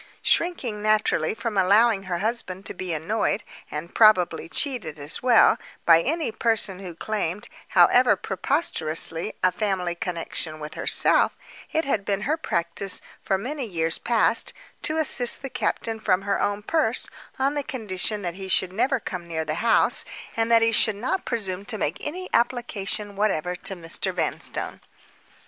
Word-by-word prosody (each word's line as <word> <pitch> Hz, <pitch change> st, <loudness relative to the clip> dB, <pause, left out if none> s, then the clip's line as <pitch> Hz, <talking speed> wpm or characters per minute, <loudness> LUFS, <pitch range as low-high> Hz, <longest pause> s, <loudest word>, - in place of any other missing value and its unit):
Shrinking, 260 Hz, -12 st, 0 dB
naturally, 215 Hz, -5 st, +1 dB
from 225 Hz, -3 st, -2 dB
allowing 200 Hz, +2 st, +4 dB
her 175 Hz, -, 0 dB
husband 200 Hz, -2 st, -3 dB
to -, -, -1 dB
be 185 Hz, -1 st, -5 dB
annoyed, 195 Hz, +7 st, -1 dB, 0.3 s
and 155 Hz, +3 st, -6 dB
probably 180 Hz, -7 st, +4 dB
cheated 220 Hz, -, -2 dB
as 145 Hz, +1 st, -3 dB
well, 245 Hz, -2 st, +5 dB, 0.3 s
by 165 Hz, -1 st, +7 dB
any 310 Hz, -, -1 dB
person 220 Hz, -5 st, 0 dB
who 180 Hz, -4 st, -8 dB
claimed, 205 Hz, 0 st, -3 dB, 0.3 s
however 245 Hz, -4 st, +6 dB
preposterously, 170 Hz, -, 0 dB
a 185 Hz, -, +4 dB
family 180 Hz, -2 st, -1 dB
connection 170 Hz, -2 st, -4 dB
with 150 Hz, 0 st, -7 dB
herself, -, -, +4 dB, 0.3 s
it 320 Hz, +1 st, 0 dB
had 225 Hz, -7 st, 0 dB
been 195 Hz, 0 st, -1 dB
her 295 Hz, +8 st, 0 dB
practice, 175 Hz, -, 0 dB, 0.2 s
for 190 Hz, -, 0 dB
many 275 Hz, +8 st, -4 dB
years 165 Hz, -4 st, -2 dB
past, 235 Hz, -2 st, +2 dB, 0.3 s
to 310 Hz, -, 0 dB
assist 265 Hz, -5 st, +2 dB
the 270 Hz, -, -5 dB
captain 225 Hz, -1 st, -2 dB
from 195 Hz, -3 st, +1 dB
her 200 Hz, 0 st, 0 dB
own 205 Hz, 0 st, -1 dB
purse, 315 Hz, +8 st, +1 dB, 0.3 s
on 270 Hz, +1 st, +1 dB
the 290 Hz, -, -1 dB
condition 210 Hz, -5 st, -2 dB
that 175 Hz, -1 st, -3 dB
he 190 Hz, +1 st, -8 dB
should 185 Hz, -1 st, +1 dB
never 260 Hz, +6 st, +1 dB
come 180 Hz, -5 st, -6 dB
near 160 Hz, -1 st, -3 dB
the 155 Hz, -, -2 dB
house, 230 Hz, -, +4 dB, 0.3 s
and 225 Hz, 0 st, 0 dB
that 230 Hz, 0 st, +6 dB
he 230 Hz, -, +3 dB
should 220 Hz, -1 st, +3 dB
not 255 Hz, -, -2 dB
presume 195 Hz, -5 st, -3 dB
to 225 Hz, -1 st, -3 dB
make 160 Hz, -4 st, -2 dB
any 365 Hz, +5 st, -5 dB
application 215 Hz, -4 st, -1 dB
whatever 180 Hz, -4 st, 0 dB
to 195 Hz, +2 st, -4 dB
Mr. 165 Hz, -2 st, -3 dB
Vanstone. -, -, -3 dB
205 Hz, 160 wpm, -24 LUFS, 180-235 Hz, 0.3 s, by